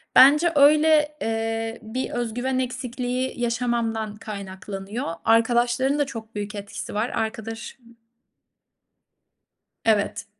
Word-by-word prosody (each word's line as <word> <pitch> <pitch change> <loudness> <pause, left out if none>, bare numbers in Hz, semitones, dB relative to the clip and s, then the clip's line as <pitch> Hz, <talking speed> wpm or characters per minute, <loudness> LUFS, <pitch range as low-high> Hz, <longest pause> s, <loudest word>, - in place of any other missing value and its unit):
Bence 300 +6 +7
öyle, 300 +1 +5
eee, 225 0 -2
bir 225 +4 -4
öz 240 -2 -2
güven 255 +2 -1
eksikliği 255 0 -3
yaşamamdan 235 -3 -1
kaynaklanıyor. 200 +1 -6 0.2
Arkadaşlarında 240 +5 +3
çok 225 -4 -9
büyük 205 +1 -4
etkisi 200 0 -6
var. 220 +4 0
Arkadaşım 225 +2 -5 1.9
Evet. 215 -2 +1
235 Hz, 90 wpm, -24 LUFS, 220-255 Hz, 1.9 s, Bence